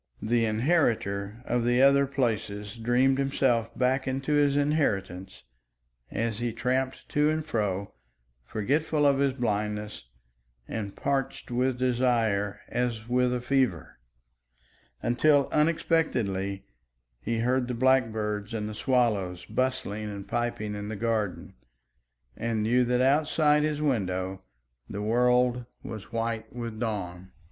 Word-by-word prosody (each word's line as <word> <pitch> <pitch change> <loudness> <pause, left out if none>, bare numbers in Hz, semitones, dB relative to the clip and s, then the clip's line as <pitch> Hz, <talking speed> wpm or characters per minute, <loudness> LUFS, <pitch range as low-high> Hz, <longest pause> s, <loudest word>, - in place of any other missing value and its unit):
The 115 +1 +1
inheritor 110 - 0
of 120 0 0
the 120 +1 +2
other 140 0 +5
places 110 -6 -2
dreamed 125 +4 +2
himself 130 -4 +1
back 130 +1 +1
into 135 +3 -1
his 145 -1 +3
inheritance 100 - -1 0.7
as 115 -1 -2
he 120 -1 -1
tramped 130 +3 -2
to 150 +1 +2
and 155 0 -1
fro, 100 -7 -2 0.5
forgetful 145 - 0
of 140 -1 +4
his 140 -1 +2
blindness 105 - -2 0.6
and 100 -3 -5
parched 135 -2 -2
with 125 +1 +1
desire 120 -5 +1
as 120 -2 -2
with 125 0 +2
a 125 -1 -1
fever 125 - 0 1.0
until 140 +4 +3
unexpectedly 120 - 0 0.5
he 115 - -2
heard 125 +1 +1
the 125 - -3
blackbirds 115 -4 +1
and 105 -1 -2
the 110 - -5
swallows 105 -7 0
bustling 130 -5 -2
and 100 -1 -6
piping 115 -2 -2
in 105 0 -5
the 110 - -4
garden, 110 -3 -2 0.8
and 115 -2 -1
knew 125 +3 +3
that 125 +1 +1
outside 150 +2 +3
his 150 -1 0
windows 95 -8 -1 0.5
the 100 - -4
world 125 +2 +2 0.2
was 110 -1 -8
white 115 -1 -3
with 115 -2 -6
dawn. 95 -5 -4
120 Hz, 125 wpm, -27 LUFS, 105-130 Hz, 1.0 s, other